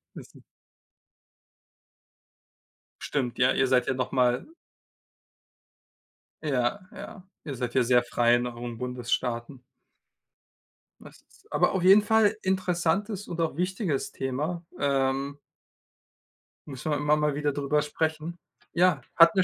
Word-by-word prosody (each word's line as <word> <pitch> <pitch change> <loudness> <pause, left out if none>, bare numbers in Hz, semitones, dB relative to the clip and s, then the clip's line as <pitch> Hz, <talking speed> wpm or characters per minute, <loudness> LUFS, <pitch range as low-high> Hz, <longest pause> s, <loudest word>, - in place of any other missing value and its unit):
Das - - -10
ist - - -16 2.6
Stimmt, 125 -4 -2
ja, 125 0 +4
ihr 135 - +2
seid 125 -1 +2
ja - - +1
noch 125 -1 -3
mal 125 -1 +2 2.0
Ja, 130 0 0
ja, 200 -3 -10 0.2
ihr 140 -4 -5
seid 120 -1 -4
ja 130 - +3
sehr 120 0 +4
frei 120 0 +3
in 120 0 0
euren 120 -1 -7
Bundesstaaten. 125 0 -3 1.4
Das - - -14
ist - - -24
aber - - +2
auf 185 -2 -1
jeden 195 +3 +8
Fall 220 0 +3
interessantes 190 +2 -1
und 170 -1 -3
auch 160 -4 -1
wichtiges 180 - -1
Thema, 150 +7 -3 0.2
ähm 135 0 0 1.3
müssen 145 +2 -5
wir 145 - +1
immer 150 +1 +2
mal 150 -1 0
wieder 145 0 0
drüber 145 +1 0
sprechen. 160 +3 -3 0.4
Ja, 175 -4 +3
hat 165 -1 +7
mir 185 - +4
145 Hz, 125 wpm, -27 LUFS, 125-170 Hz, 2.6 s, jeden